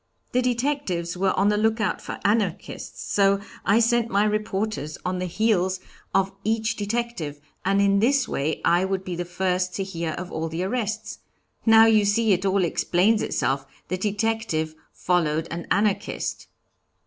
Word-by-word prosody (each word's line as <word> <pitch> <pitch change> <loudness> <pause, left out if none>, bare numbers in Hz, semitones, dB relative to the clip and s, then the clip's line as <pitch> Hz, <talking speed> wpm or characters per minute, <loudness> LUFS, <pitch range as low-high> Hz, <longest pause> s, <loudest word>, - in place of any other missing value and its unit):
'The 250 - +2
detectives 240 -9 -1
were 190 +1 +1
on 200 +2 +4
the 210 - +2
lookout 220 0 +1
for - - -6
Anarchists, 205 -4 -1
so 200 -1 +3 0.2
I 200 - +4
sent 235 0 +2
my 200 -1 +3
reporters 210 -6 -2
on 185 0 -1
the 185 - -2
heels 190 -1 +1 0.3
of 195 0 +2
each 220 +1 0
detective, 205 -8 -3 0.2
and 195 +1 +2
in 200 0 +4
this 270 +5 +3
way 150 +3 -2
I 175 +2 +4
would 190 0 -1
be 180 -2 -4
the 175 +1 -3
first 180 +1 -1
to 195 - -1
hear 170 -4 -3
of 180 +2 -6
all 160 0 -3
the 165 +3 -3
arrests. 215 0 -3 0.5
Now, 225 0 +8
you 220 -2 +5
see, 205 +1 +3
it 185 +2 0
all 195 0 +2
explains 190 +6 +2
itself; 135 +1 -1 0.2
the 185 - -1
detective 205 -6 -1 0.2
followed 165 -3 0
an 170 +1 -5
Anarchist.'" 205 +1 -1
195 Hz, 160 wpm, -24 LUFS, 180-220 Hz, 0.5 s, Now